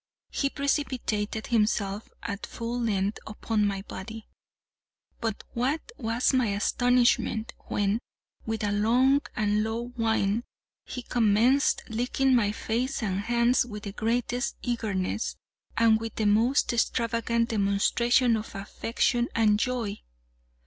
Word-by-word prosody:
He 275 Hz, -, 0 dB
precipitated 255 Hz, -7 st, -1 dB
himself 210 Hz, -2 st, 0 dB
at 200 Hz, 0 st, -4 dB
full 235 Hz, +1 st, -4 dB
length 205 Hz, -2 st, 0 dB
upon 215 Hz, 0 st, 0 dB
my 195 Hz, -1 st, -3 dB
body; 220 Hz, +2 st, -8 dB, 0.9 s
but 225 Hz, -3 st, -3 dB
what 275 Hz, -, -1 dB
was 230 Hz, +2 st, 0 dB
my 255 Hz, -3 st, +3 dB
astonishment, 235 Hz, +2 st, +2 dB
when, 205 Hz, +2 st, 0 dB, 0.4 s
with 225 Hz, -1 st, -3 dB
a 205 Hz, -, +1 dB
long 245 Hz, +7 st, +3 dB
and 210 Hz, 0 st, +1 dB
low 230 Hz, +2 st, -3 dB
whine, 225 Hz, -2 st, 0 dB, 0.4 s
he 250 Hz, -, -6 dB
commenced 235 Hz, +5 st, +3 dB
licking 250 Hz, +4 st, +1 dB
my 210 Hz, -4 st, +3 dB
face 235 Hz, +4 st, -2 dB
and 195 Hz, -2 st, -1 dB
hands 235 Hz, +3 st, +2 dB
with 210 Hz, -4 st, -8 dB
the 200 Hz, -, -5 dB
greatest 240 Hz, +4 st, -1 dB
eagerness, 220 Hz, -4 st, -2 dB, 0.4 s
and 225 Hz, -1 st, +5 dB
with 225 Hz, -1 st, -5 dB
the 220 Hz, -, -1 dB
most 230 Hz, +6 st, +3 dB
extravagant 230 Hz, 0 st, 0 dB
demonstration 230 Hz, +4 st, +2 dB
of 215 Hz, -1 st, -5 dB
affection 230 Hz, +4 st, 0 dB
and 210 Hz, -2 st, +4 dB
joy! 230 Hz, -4 st, -2 dB
225 Hz, 120 wpm, -27 LUFS, 210-245 Hz, 0.9 s, and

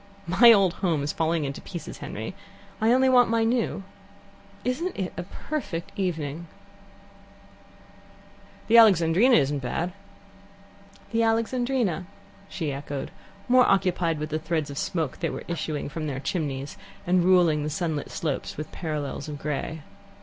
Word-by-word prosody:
"My 210 Hz, +8 st, +7 dB
old 195 Hz, -5 st, +5 dB
home's 155 Hz, -6 st, 0 dB
falling 160 Hz, -1 st, 0 dB
into 135 Hz, 0 st, -5 dB
pieces, 170 Hz, -5 st, -8 dB
Henry. 110 Hz, -, -6 dB, 0.5 s
I 220 Hz, +1 st, +4 dB
only 260 Hz, +1 st, +4 dB
want 250 Hz, -2 st, +5 dB
my 230 Hz, 0 st, +2 dB
new. 225 Hz, -3 st, 0 dB, 0.8 s
Isn't 305 Hz, +9 st, -2 dB
it 190 Hz, -3 st, -3 dB
a -, -, -3 dB
perfect 190 Hz, -, -5 dB
evening 165 Hz, -4 st, -3 dB, 1.0 s
" -, -, -25 dB
"The 230 Hz, +1 st, +7 dB
Alexandrina 195 Hz, +3 st, +5 dB
isn't 145 Hz, 0 st, +2 dB
bad 165 Hz, +8 st, -3 dB, 0.6 s
" 200 Hz, 0 st, -25 dB
"The 230 Hz, -, +1 dB
Alexandrina," 230 Hz, -5 st, 0 dB, 0.4 s
she 155 Hz, -6 st, -3 dB
echoed, 140 Hz, 0 st, -5 dB, 0.4 s
more 250 Hz, 0 st, +5 dB
occupied 175 Hz, -4 st, +2 dB
with 150 Hz, +1 st, -4 dB
the 155 Hz, -, -1 dB
threads 160 Hz, -2 st, -2 dB
of 140 Hz, -, -5 dB
smoke 160 Hz, -6 st, -2 dB
that 165 Hz, -3 st, -2 dB
were -, -, -6 dB
issuing 155 Hz, -3 st, -3 dB
from 155 Hz, +1 st, -4 dB
their 135 Hz, -2 st, -3 dB
chimneys, 140 Hz, -, -3 dB, 0.3 s
and 180 Hz, 0 st, +3 dB
ruling 175 Hz, -4 st, +4 dB
the 150 Hz, -, -2 dB
sunlit 160 Hz, -2 st, -2 dB
slopes 150 Hz, -5 st, -3 dB
with 155 Hz, -, -6 dB
parallels 150 Hz, -3 st, -4 dB
of 145 Hz, -, -5 dB
grey. 150 Hz, +2 st, -4 dB
170 Hz, 145 wpm, -26 LUFS, 150-200 Hz, 1.0 s, My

